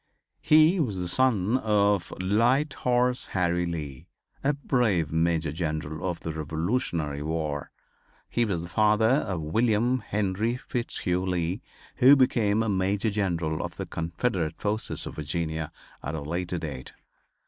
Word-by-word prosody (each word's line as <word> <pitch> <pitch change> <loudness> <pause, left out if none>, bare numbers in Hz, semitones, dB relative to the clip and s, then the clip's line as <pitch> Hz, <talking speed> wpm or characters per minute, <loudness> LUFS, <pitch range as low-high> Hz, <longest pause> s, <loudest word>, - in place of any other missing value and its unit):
He 155 +4 +5
was 115 - 0
the 90 -1 -2
son 115 +1 +2
of 105 -4 +2
"Light 120 +10 +2
Horse 125 0 +1
Harry 90 -1 +1
Lee," 75 -6 -6 0.4
a 145 +2 +3
brave 120 - +1
Major 80 -1 +1
General 80 +1 -3
of 85 - -5
the 80 - -4
Revolutionary 80 - -2
War. 75 -2 -3 0.6
He 120 - +1
was 90 -7 -1
the - - -6
father 105 +4 +3
of 105 - +1
William 115 +8 +2
Henry 105 +2 -1
Fitzhugh 95 -8 -2
Lee, 90 +3 -1 0.4
who 135 +2 +8
became 115 -5 +2
a - - -2
Major 100 +3 +1
General 85 -6 -1
of - - -6
the - - -3
Confederate 85 0 -2
forces 105 +2 -2
of - - -8
Virginia, 80 +1 -3 0.3
at 75 +4 -4
a 75 - -4
later 85 +4 -3
date. 70 -6 -6
95 Hz, 140 wpm, -27 LUFS, 80-115 Hz, 0.6 s, who